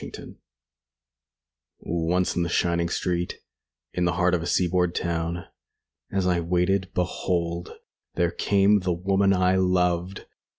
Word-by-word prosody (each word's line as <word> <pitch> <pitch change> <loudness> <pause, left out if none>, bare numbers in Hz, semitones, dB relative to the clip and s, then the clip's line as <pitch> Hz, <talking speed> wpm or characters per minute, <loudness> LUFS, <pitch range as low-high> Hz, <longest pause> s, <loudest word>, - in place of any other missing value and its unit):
LXXVIII - - -10 1.4
Once 85 +2 0
in 90 - +1
the 85 - -1
shining 85 0 +1
street, 90 0 -2 0.6
In 90 - 0
the 85 - +1
heart 90 -1 +2
of 90 - +1
a 85 - -4
seaboard 90 -1 +1
town, 85 0 -2 0.7
As 95 -1 0
I 90 -1 +2
waited, 90 +2 0
behold, 85 -1 -2 0.4
there 85 -1 +1
came 100 +2 +3
The 90 -1 -1
woman 95 +3 +2
I 95 0 +3
loved. 90 0 0
90 Hz, 130 wpm, -25 LUFS, 85-95 Hz, 1.4 s, came